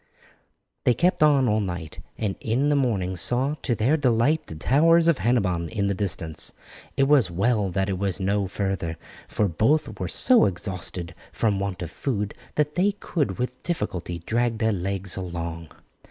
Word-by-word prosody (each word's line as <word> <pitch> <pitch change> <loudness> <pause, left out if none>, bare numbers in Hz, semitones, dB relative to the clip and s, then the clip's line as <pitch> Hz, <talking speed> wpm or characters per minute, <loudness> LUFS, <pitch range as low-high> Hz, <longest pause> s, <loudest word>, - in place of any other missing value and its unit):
They 125 - +3
kept 180 -1 +1
on 145 -4 +5
all 105 -1 +2
night, 90 -6 -5 0.2
and 105 -3 -2
in 130 +6 +1
the 145 - +3
morning 100 -9 0
saw 125 - +1
to 120 - 0
their 125 +9 +2
delight 135 +3 +2
the 80 - -8
towers 165 - +4
of 165 -8 +3
Hennebon 95 -7 +1
in 105 -3 -1
the 100 - +1
distance. 85 -5 -2 0.4
It 135 - +4
was 135 -7 +4
well 100 +3 +1
that 95 +1 -1
it 95 -2 -2
was 100 -1 -1
no 100 +1 0
further, 95 -4 -3 0.3
for 105 - 0
both 110 - +1
were 90 - -2
so 245 - +4
exhausted 90 -2 -4 0.2
from 105 -3 0
want 95 -2 -3
of 85 - -6
food 105 -5 -2 0.2
that 150 0 +1
they 195 +4 +2
could 145 - -2
with 125 0 -4
difficulty 90 - -3
drag 120 0 0
their 110 0 +1
legs 95 0 -2
along. 85 -3 -5
105 Hz, 170 wpm, -25 LUFS, 90-130 Hz, 0.4 s, on